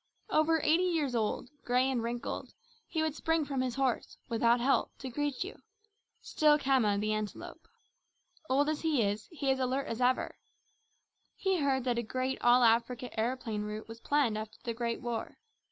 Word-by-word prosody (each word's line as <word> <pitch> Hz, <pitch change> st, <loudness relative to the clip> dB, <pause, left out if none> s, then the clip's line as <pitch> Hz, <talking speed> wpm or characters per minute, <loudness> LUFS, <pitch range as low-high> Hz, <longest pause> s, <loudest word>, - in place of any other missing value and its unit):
Over 320 Hz, +1 st, +3 dB
eighty 335 Hz, +4 st, +4 dB
years 315 Hz, -7 st, 0 dB
old, 230 Hz, +1 st, -1 dB
grey 250 Hz, +2 st, +2 dB
and 260 Hz, -3 st, 0 dB
wrinkled, 235 Hz, +1 st, -4 dB, 0.3 s
he 320 Hz, -2 st, -1 dB
would 315 Hz, -2 st, 0 dB
spring 325 Hz, 0 st, 0 dB
from 275 Hz, -2 st, -1 dB
his 255 Hz, -2 st, -2 dB
horse, 270 Hz, -3 st, -1 dB
without 235 Hz, +1 st, +3 dB
help, 265 Hz, +3 st, +1 dB
to 265 Hz, -, -6 dB
greet 290 Hz, +2 st, -1 dB
you 390 Hz, -, -9 dB, 0.6 s
still 300 Hz, -1 st, +3 dB
Khama, 260 Hz, -8 st, +2 dB
the 215 Hz, +1 st, 0 dB
Antelope. 215 Hz, -1 st, -5 dB, 0.8 s
Old 280 Hz, +3 st, +3 dB
as 305 Hz, -1 st, -1 dB
he 305 Hz, -7 st, +2 dB
is, 205 Hz, +1 st, -2 dB
he 285 Hz, -5 st, 0 dB
is 265 Hz, -, 0 dB
as -, -, +1 dB
alert 260 Hz, +2 st, 0 dB
as 230 Hz, +2 st, -4 dB
ever. 250 Hz, +1 st, +1 dB, 1.0 s
He 385 Hz, -2 st, 0 dB
heard 270 Hz, -3 st, +1 dB
that 240 Hz, -2 st, 0 dB
a -, -, +1 dB
great 255 Hz, +3 st, -2 dB
all 245 Hz, +1 st, +6 dB
Africa 235 Hz, +2 st, +2 dB
aeroplane 225 Hz, -2 st, -1 dB
route 210 Hz, +1 st, -5 dB
was 225 Hz, +1 st, -9 dB
planned 250 Hz, -6 st, +1 dB
after 215 Hz, 0 st, -8 dB
the 235 Hz, -2 st, -2 dB
Great 235 Hz, 0 st, -2 dB
War. 240 Hz, -3 st, -4 dB
255 Hz, 180 wpm, -31 LUFS, 230-285 Hz, 1.0 s, all